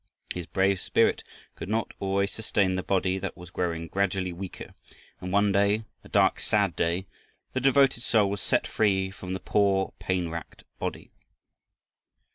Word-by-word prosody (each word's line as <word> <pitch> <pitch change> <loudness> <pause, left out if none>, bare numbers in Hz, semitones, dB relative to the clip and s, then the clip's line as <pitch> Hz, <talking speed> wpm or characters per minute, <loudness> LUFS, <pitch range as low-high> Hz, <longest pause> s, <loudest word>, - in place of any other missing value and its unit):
His 90 -2 -5
brave 95 0 +1
spirit - - +2 0.3
could 90 - -7
not 110 +1 0
always 100 +1 0
sustain 100 -4 +1
the 95 - -1
body 95 0 +1
that 100 +1 -5
was 90 -1 -11
growing 85 -3 -2
gradually 95 -1 0
weaker, 90 +1 -8 0.5
and 90 - -5
one 100 +1 +3
day, 100 +2 +3 0.2
a - - -14
dark, - - +3
sad - - +1
day, 85 +3 0 0.5
the 130 - -1
devoted 135 -2 +4
soul 110 -4 +3
was 100 -1 -3
set - - +1
free 95 -3 +1
from 95 -1 -6
the 95 - -3
poor 100 -2 +2
pain 90 -2 -1
racked 85 -2 -7 0.2
body. - - -4
95 Hz, 160 wpm, -27 LUFS, 90-100 Hz, 0.5 s, devoted